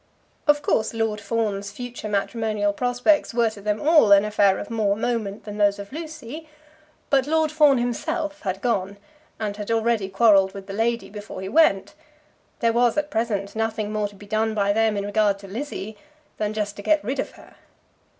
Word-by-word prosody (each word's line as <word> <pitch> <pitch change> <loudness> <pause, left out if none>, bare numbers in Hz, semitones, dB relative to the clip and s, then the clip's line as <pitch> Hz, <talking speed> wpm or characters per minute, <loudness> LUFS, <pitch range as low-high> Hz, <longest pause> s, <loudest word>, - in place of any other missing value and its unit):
Of 295 0 +4
course, 220 -4 0
Lord 220 -2 -1
Fawn's 205 -3 -2
future 240 +1 -7
matrimonial 210 0 0
prospects 245 +4 +1
were 230 -2 +3
to 205 - -12
them 210 +1 -1
all 300 -8 +5
an 200 +1 +7
affair 205 -2 +3
of 205 - -7
more 210 -3 +1
moment 220 -2 -2
than 210 0 -7
those 205 -1 +3
of 200 0 -9
Lucy; 310 -1 -8 0.6
but 270 -1 +3
Lord 315 0 +2
Fawn 300 -3 +5
himself 300 +6 -2
had 190 -1 -3
gone, 200 -5 -1 0.4
and 210 -2 -3
had 210 0 -6
already 225 -3 +1
quarrelled 195 -1 +4
with 195 -1 -8
the 195 - -7
lady 225 -2 -1
before 210 -2 -8
he 190 - -5
went. 285 -11 +3 0.7
There 230 -1 +3
was 240 +1 +2
at 300 0 -1
present 215 -3 -2
nothing 220 -1 -2
more 210 -1 0
to 205 - -15
be 205 - -13
done 215 +1 0
by 200 -1 +2
them 220 -1 +2
in 200 - -2
regard 205 -1 +2
to 200 0 -12
Lizzie, 220 -1 -6 0.4
than 210 0 -2
just 205 -1 -2
to - - -6
get 310 +7 +2
rid 265 +3 -3
of - - -3
her. - - -17
220 Hz, 190 wpm, -23 LUFS, 205-245 Hz, 0.7 s, an